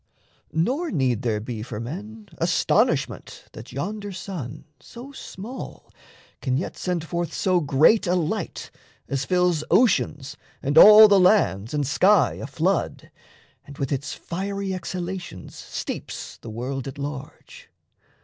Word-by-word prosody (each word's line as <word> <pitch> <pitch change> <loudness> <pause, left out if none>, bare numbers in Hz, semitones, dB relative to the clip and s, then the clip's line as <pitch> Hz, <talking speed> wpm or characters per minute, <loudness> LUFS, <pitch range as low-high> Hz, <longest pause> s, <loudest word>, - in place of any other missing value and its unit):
Nor 260 - 0
need 130 - 0
there 115 -4 0
be 110 0 -6
for 110 -2 -6
men 205 - -7
Astonishment 170 +2 0
that - - -11
yonder 205 - -4
sun 165 -8 -7
so 245 - -11
small 245 -2 -9 0.5
Can 130 -2 0
yet 170 - -4
send 180 -3 -2
forth 170 +1 -3
so 185 -2 +1
great 155 +8 +4
a 180 - +2
light 165 -4 -3 0.4
as 135 -1 -2
fills 180 -1 +1
Oceans 150 - +2 0.3
and 140 +2 -1
all 215 +5 +10
the 200 -1 +5
lands 180 - +3
and 145 -1 -1
sky 185 +7 +3
aflood, - - -2 0.5
And 140 -1 -13
with 135 -2 -3
its 140 0 -3
fiery 195 +2 -4
exhalations 180 - -6
steeps - - -6
The 115 - -10
world 125 +4 -4
at 135 - -7
large. 140 -1 -8
170 Hz, 130 wpm, -24 LUFS, 135-195 Hz, 0.5 s, all